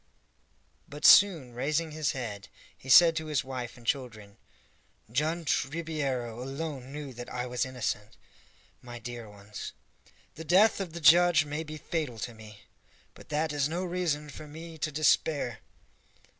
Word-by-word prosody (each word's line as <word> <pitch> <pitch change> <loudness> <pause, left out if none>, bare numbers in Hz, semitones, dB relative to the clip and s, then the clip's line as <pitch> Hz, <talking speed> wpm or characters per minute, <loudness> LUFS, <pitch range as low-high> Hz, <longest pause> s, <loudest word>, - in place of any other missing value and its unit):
But 145 +1 -5
soon 165 -11 +7
raising 150 +6 -1
his 155 -1 -1
head, 105 -7 -6 0.3
he 135 - -13
said 165 +5 +8
to 160 -1 -3
his 150 -4 0
wife 125 -3 -6
and 120 - -16
children, 115 -6 -3 0.7
"Judge 155 +5 0
Ribeiro 140 -7 -3
alone 135 0 -5
knew 145 -2 -7
that 120 0 -9
I 125 0 -3
was 125 +1 -2
innocent, 115 -4 -4 0.6
my 120 -1 -9
dear 120 -1 -8
ones. 105 +1 -9 0.6
The 160 - -8
death 190 +7 +4
of 185 -5 -4
the 170 - -6
judge 170 -1 +6
may 150 +2 -4
be 155 0 -8
fatal 150 -6 -3
to 120 +2 -5
me, 110 -1 -13 0.5
but - - -16
that 155 +1 -1
is 145 0 +1
no 175 +3 -2
reason 165 -5 -2
for 150 - -10
me 160 +2 -9
to 155 - -2
despair." 145 -4 +1
145 Hz, 155 wpm, -29 LUFS, 120-160 Hz, 0.7 s, said